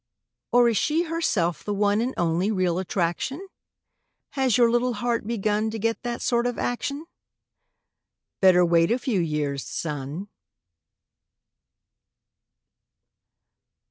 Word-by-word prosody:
Or 245 0 +5
is 230 -3 +1
she 315 - +1
herself 275 - -1
the 205 - -2
one 205 +1 +2
And 250 +2 -2
only 175 +3 +1
real 185 -4 0
attraction? 190 - -2 0.8
Has 260 -4 +1
your 240 -1 +5
little 240 +1 +1
heart 235 0 -2
begun 215 -1 0
To 220 - -5
get 230 +1 -1
that 240 -1 -4
sort 240 0 +1
of 245 - -3
action? 280 +5 -3 1.3
Better 180 -2 +5
wait 170 -1 +3
a 235 - +2
few 250 -6 -1
years, 150 -4 -2
son. 150 +4 -5
215 Hz, 115 wpm, -25 LUFS, 175-245 Hz, 1.3 s, Or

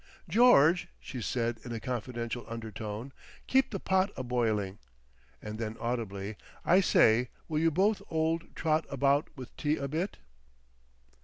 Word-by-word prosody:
"George," 180 - +5
she 125 - -7
said 115 0 -1
in 120 - -7
a 115 - -3
confidential 120 -1 -4
undertone, 110 +2 -6 0.3
"keep 265 +1 +3
the 195 - -4
pot 190 +2 +2
a 130 - -3
boiling." 110 -5 0 0.6
And 105 +1 -6
then 110 0 -4
audibly, 110 -4 -3 0.3
"I 185 - +6
say, 120 - +4 0.2
will 155 -2 0
you 165 +1 +4
both 195 +7 +2
old 165 +1 -1
trot 155 0 +1
about 140 +2 +2
with 130 -3 -10
tea 150 +1 +1
a 140 - -3
bit?" 165 +8 -2
130 Hz, 145 wpm, -30 LUFS, 115-160 Hz, 0.6 s, I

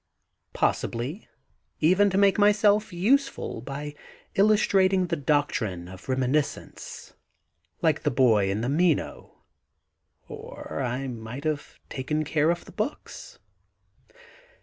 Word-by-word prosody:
Possibly, 130 - -1 0.5
even 185 +6 +4
to 190 - -1
make 200 0 +4
myself 210 +1 +4
useful 235 - 0
by 145 +3 -6 0.4
illustrating 195 -2 +3
the 170 -1 -1
doctrine 130 - -1
of 95 +1 -12
reminis 130 +3 +2
cence, - - -11 0.7
like - - +2
the - - +1
boy 115 -6 +3
in 100 +3 -1
the 120 - -1
Meno; 160 +1 0 0.8
or 80 - -7
I 125 +2 -2
might 120 +2 -7
have 155 -2 -3
taken 150 +3 -2
care 155 +1 +1
of 170 0 -1
the - - -12
books. 225 +8 -5
150 Hz, 115 wpm, -26 LUFS, 125-195 Hz, 0.8 s, even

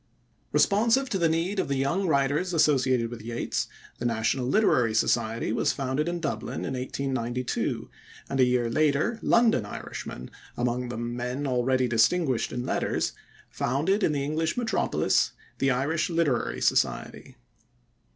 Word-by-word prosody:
Responsive 230 +6 +3
to 195 - 0
the 165 -2 +3
need 170 +5 0
of - - 0
the 140 - -1
young 170 +9 0
writers 145 +4 +1
associated 130 -6 +2
with 120 -2 -7
Yeats, 115 +2 -2 0.3
the - - -5
National 120 +2 0
Literary 125 - +3
Society 115 0 +1
was - - +1
founded 135 +4 -1
in 175 0 -3
Dublin 165 - -3
in 135 - -3
1892, 125 -1 -2 0.4
and 135 - -3
a - - +7
year 125 -1 +2
later 155 - +1
London 230 - +3
Irishmen, 65 -9 -7 0.3
among 125 0 -1
them 120 0 -4
men 125 +3 -3
already 130 0 +1
distinguished 130 +3 +2
in 125 0 -3
letters, - - -1 0.4
founded 155 - 0
in 175 - +2
the 140 -2 -1
English 155 +5 -1
metropolis 225 -5 +1 0.3
the 135 - +2
Irish 140 +7 0
Literary 165 -8 0
Society. - - 0
135 Hz, 140 wpm, -27 LUFS, 120-165 Hz, 0.4 s, a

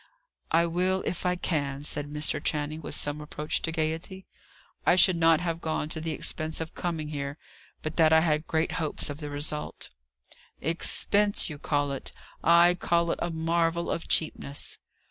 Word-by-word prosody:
"I 165 +1 +4
will 185 +3 +1
if 180 +1 -2
I 180 - +2
can," 145 -5 -1
said 145 -1 -3
Mr. 150 0 -1
Channing, 150 +1 -1
with 145 - -5
some 145 0 -2
approach 150 0 -2
to 165 - -1
gaiety. 165 +4 -2 0.6
"I 175 - +5
should 185 0 +6
not 165 -1 +5
have 165 -1 -2
gone 155 -1 -1
to 160 0 -4
the 165 - -3
expense 155 +1 -1
of 160 0 -5
coming 160 -4 -3
here, 140 -1 -4 0.5
but 155 +1 -4
that 160 -2 +6
I 160 0 +7
had 155 -1 +1
great 160 0 +1
hopes 155 -3 -1
of 145 - -7
the 150 -2 -5
result." 150 +1 -3 0.7
"Expense, 200 +5 +1
you 145 - -7
call 145 -2 0
it! 135 - -3 0.3
I 170 +1 +7
call 170 -1 +1
it - - -2
a 175 - 0
marvel 165 +1 0
of 165 - -3
cheapness." 145 -3 -1
160 Hz, 175 wpm, -28 LUFS, 150-170 Hz, 0.7 s, I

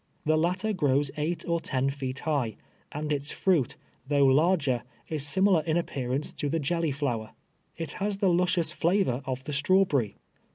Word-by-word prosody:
The 155 +1 +3
latter 185 +7 +1
grows 145 -5 +1
eight 160 +3 -2
or 170 0 +1
ten 135 -3 -1
feet 130 -2 -4
high, 135 -9 -1 0.4
and 150 +1 -2
its 145 0 0
fruit, 170 -10 +1 0.3
though 140 -1 +3
lar 155 +8 +4
ger, 130 -6 -1 0.3
is 150 -3 -2
similar 190 0 +3
in 160 +1 0
appearance 135 -4 -2
to 145 - -3
the 165 - 0
jelly 165 +2 0
flower. 125 -6 -2 0.4
It 165 -3 -3
has 205 0 0
the 195 -2 +2
luscious 175 -1 +1
flaA^or 170 -8 +1
of 130 0 -3
the 150 - -5
strawberry. 145 - +2
150 Hz, 170 wpm, -28 LUFS, 135-175 Hz, 0.4 s, lar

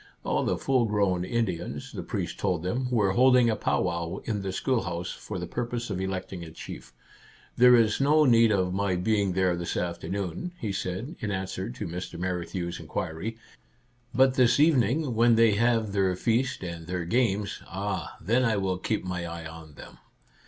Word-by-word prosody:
All - - 0
the - - 0
full 130 -3 +2
grown 100 -4 +1
Indians, 95 -5 -2
the - - -5
priest - - -4
told 90 -4 0
them, 125 +8 -1
were 105 -6 +2
holding 125 +1 +5
a - - 0
pow - - 0
wow 85 0 -2
in 105 -3 -2
the 95 -1 -3
schoolhouse, 95 -7 -1
for - - -7
the - - -4
purpose 120 -1 -3
of 95 -1 -2
electing 95 -1 -4
a 80 - -8
chief. 80 -6 -9 0.3
" - - -26
There 125 0 +8
is 115 +1 +3
no 150 +2 +5
need 115 -3 +5
of 95 -3 +1
my 100 -1 0
being 100 +1 +1
there 90 -1 +2
this 85 0 -3
afternoon," 90 - -3
he 105 - -2
said, 95 - -4
in 110 - -3
answer 95 +1 -3
to 125 -2 -5
Mr. 90 0 -6
Men 90 0 -2
knew' 85 -2 -3
s 85 - -6
inquiry; 95 +9 -4 0.4
" 120 -1 -24
but 130 -1 +6
this 125 0 +4
evening, 145 -2 +3
when 115 +1 +4
they 115 -1 +5
have 115 0 +2
their 95 -2 +1
feast 120 +4 0
and 85 -2 -6
their 90 -1 -3
games, 105 -1 0
— - - -18
ah, 100 0 -4
then 115 +8 +2
I 115 -4 +2
will 95 -2 -1
keep 110 0 -2
my 90 -1 -3
eye 85 -1 -7
on 80 -2 -10
them - - -12
100 Hz, 195 wpm, -27 LUFS, 90-120 Hz, 0.4 s, There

